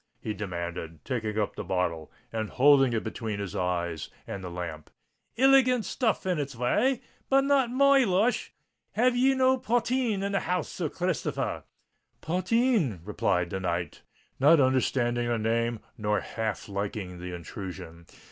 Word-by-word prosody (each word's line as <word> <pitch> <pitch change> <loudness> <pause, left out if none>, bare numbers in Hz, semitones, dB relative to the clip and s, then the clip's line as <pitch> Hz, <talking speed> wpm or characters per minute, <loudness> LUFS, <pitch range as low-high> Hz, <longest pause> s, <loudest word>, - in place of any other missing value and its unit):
he 110 - -4
demanded, 85 -5 -5
taking 110 -4 -2
up 105 -2 -1
the - - -5
bottle 85 -4 -2 0.2
and 110 -2 -2
holding 135 -1 +5
it 115 -2 -1
between 110 -1 -4
his 100 -1 -5
eyes 85 -3 -2 0.2
and 100 -1 -6
the 90 - -5
lamp. 85 -3 -6 0.5
"Iligant 255 -2 +5
stuff 225 -7 0
in 180 -4 0
its 140 -2 -4
way—but 255 - +1
not 275 -3 +3
my 275 +2 +5
lush. 210 +3 +1 0.4
Have 245 +3 +3
ye 265 +2 +4
no 260 0 +3
potheen 240 -3 0
in 200 - -1
the 195 - +1
house, 180 -2 -2
Sir 165 -4 -3
Christopher 180 0 -2
r?" - - -3 0.6
"Potheen?" 185 - +1
repeated 90 -4 0
the 95 - -2
knight, 85 -2 -3 0.4
not 150 +4 +6
understanding 125 -2 +2
the 120 -1 +1
name 115 +1 0 0.2
nor 105 0 +1
half 110 -2 -4
liking 100 -2 -4
the 90 0 -6
intrusion. 85 -1 -8
120 Hz, 150 wpm, -28 LUFS, -, 0.6 s, not